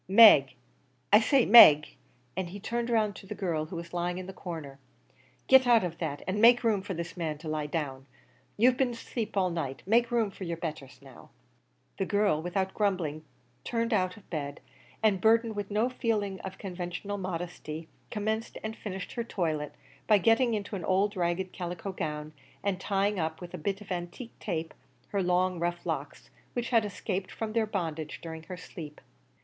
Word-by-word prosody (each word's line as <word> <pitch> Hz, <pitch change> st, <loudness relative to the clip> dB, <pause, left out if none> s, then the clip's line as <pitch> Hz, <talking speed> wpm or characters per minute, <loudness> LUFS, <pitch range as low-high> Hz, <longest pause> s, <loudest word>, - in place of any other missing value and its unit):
Meg! 195 Hz, -9 st, +8 dB, 0.6 s
I 210 Hz, -, +10 dB
say, 255 Hz, +3 st, +3 dB
Meg," 155 Hz, -9 st, +9 dB, 0.5 s
and 185 Hz, -1 st, -2 dB
he 200 Hz, +3 st, -8 dB
turned 235 Hz, +3 st, -2 dB
round 215 Hz, -3 st, +2 dB
to 195 Hz, -, -12 dB
the -, -, -5 dB
girl 165 Hz, -6 st, -1 dB
who 170 Hz, -, -8 dB
was 170 Hz, +1 st, -7 dB
lying 175 Hz, 0 st, -1 dB
in 185 Hz, -, -5 dB
the 190 Hz, -, -8 dB
corner 160 Hz, -7 st, -7 dB, 0.7 s
"get 265 Hz, -1 st, +6 dB
out 235 Hz, -3 st, +6 dB
of 170 Hz, -2 st, -4 dB
that, 145 Hz, -4 st, -3 dB
an' 200 Hz, +3 st, 0 dB
make 240 Hz, +1 st, +7 dB
room 215 Hz, -4 st, +2 dB
for 190 Hz, -1 st, -5 dB
this 170 Hz, +1 st, -5 dB
man 160 Hz, -4 st, -3 dB
to 155 Hz, -, -10 dB
lie 155 Hz, -1 st, -2 dB
down. 140 Hz, -4 st, -4 dB, 0.5 s
You've 250 Hz, +4 st, +4 dB
been 265 Hz, -2 st, +2 dB
asleep 230 Hz, -2 st, -5 dB
all 185 Hz, -2 st, +2 dB
night; 140 Hz, -6 st, -4 dB
make 235 Hz, +3 st, +3 dB
room 230 Hz, -4 st, +1 dB
for 195 Hz, -, -9 dB
yer 170 Hz, -2 st, -3 dB
betthers 140 Hz, -5 st, -7 dB
now." 135 Hz, -3 st, -14 dB, 0.7 s
The 195 Hz, -, 0 dB
girl, 200 Hz, -6 st, +2 dB
without 190 Hz, +3 st, -2 dB
grumbling, 180 Hz, -7 st, -1 dB, 0.4 s
turned 230 Hz, 0 st, -1 dB
out 185 Hz, -1 st, +1 dB
of 205 Hz, -, -17 dB
bed, 145 Hz, -3 st, -4 dB, 0.4 s
and 200 Hz, -4 st, +3 dB
burthened 225 Hz, +1 st, +3 dB
with 205 Hz, -1 st, -4 dB
no 215 Hz, +3 st, +2 dB
feeling 215 Hz, -6 st, -1 dB
of 190 Hz, 0 st, -7 dB
conventional 185 Hz, +2 st, -5 dB
modesty, 165 Hz, -3 st, -5 dB, 0.2 s
commenced 220 Hz, +2 st, -2 dB
and 220 Hz, 0 st, -4 dB
finished 190 Hz, -4 st, -6 dB
her 235 Hz, -, -3 dB
toilet, 155 Hz, -9 st, -2 dB, 0.3 s
by 215 Hz, -, +6 dB
getting 225 Hz, +4 st, +3 dB
into 205 Hz, 0 st, -4 dB
an 185 Hz, -, -5 dB
old 195 Hz, +4 st, +1 dB
ragged 180 Hz, +1 st, -1 dB
calico 180 Hz, +2 st, -5 dB
gown, 150 Hz, -3 st, -4 dB, 0.3 s
and 190 Hz, -2 st, -1 dB
tying 200 Hz, 0 st, 0 dB
up, 160 Hz, -1 st, -2 dB
with 175 Hz, 0 st, -9 dB
a -, -, -4 dB
bit 195 Hz, +5 st, -2 dB
of 200 Hz, -2 st, -11 dB
antique 180 Hz, +7 st, -5 dB
tape, 160 Hz, 0 st, -3 dB, 0.4 s
her 200 Hz, -, 0 dB
long 180 Hz, 0 st, +1 dB
rough 175 Hz, 0 st, -2 dB
locks -, -, -4 dB, 0.2 s
which 240 Hz, -1 st, -2 dB
had 230 Hz, -3 st, +3 dB
escaped 195 Hz, -2 st, -3 dB
from 220 Hz, -1 st, -4 dB
their 225 Hz, -1 st, +1 dB
bondage 160 Hz, -7 st, -3 dB
during 160 Hz, -1 st, -7 dB
her 180 Hz, +3 st, -8 dB
sleep. 155 Hz, -4 st, -9 dB
190 Hz, 190 wpm, -29 LUFS, 165-215 Hz, 0.7 s, I